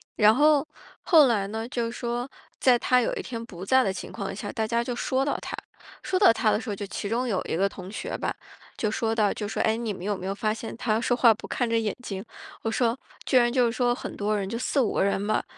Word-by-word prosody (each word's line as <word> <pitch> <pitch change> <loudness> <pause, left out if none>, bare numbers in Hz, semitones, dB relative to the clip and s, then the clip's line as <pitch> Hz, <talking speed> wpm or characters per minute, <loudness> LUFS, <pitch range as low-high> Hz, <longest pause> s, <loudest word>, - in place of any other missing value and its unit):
然 210 0 +6
后 295 +3 +4 0.4
后 315 -6 +6
来 215 -5 +1
呢， 220 +2 -4
就 235 -2 -2
说 240 +1 -3 0.3
在 250 -2 +5
他 250 +1 +3
有 - - -1
一 - - -3
天 230 -2 -6
不 185 -4 -9
在 260 +5 +4
的 195 - 0
情 190 - -7
况 200 -3 -5
下， 205 +1 -6
大 220 - -1
家 235 +2 +1
就 240 +1 -3
说 260 +3 0
到 285 - 0
他， - - -6 0.5
说 375 - -1
到 395 - +7
他 225 -1 +1
的 210 - +1
时 250 - -7
候， 205 - -2
就 200 0 -6
其 200 - -4
中 245 +3 0
有 195 -6 0
一 - - -2
个 195 +2 +3
同 190 -1 -9
学 220 - -4
吧， - - -2 0.4
就 215 - 0
说 225 +1 -1
到， 215 -3 +2
就 210 - -4
说： 205 - -4
“哎， 220 - +2
你 225 -2 -3
们 180 - -9
有 205 +1 0
没 185 - -7
有 195 - -1
发 215 +2 -1
现 225 +1 -7
他 230 -2 0
说 245 0 +1
话 235 -3 +6
不 220 - -11
看 245 -2 -1
着 230 - +2
眼 220 -3 0
睛？” 195 -5 -5 0.4
我 225 - -1
说， 235 +1 +1 0.3
居 - - 0
然 240 -1 +5
就 245 -2 +3
说 245 +1 +1
很 245 - -6
多 210 +1 0
人- 195 - -3
就 230 - -3
4-5 255 -1 +1
个 - - +2
人 200 +1 0
吧- 215 - +1
225 Hz, 280 characters per minute, -26 LUFS, 205-245 Hz, 0.5 s, 到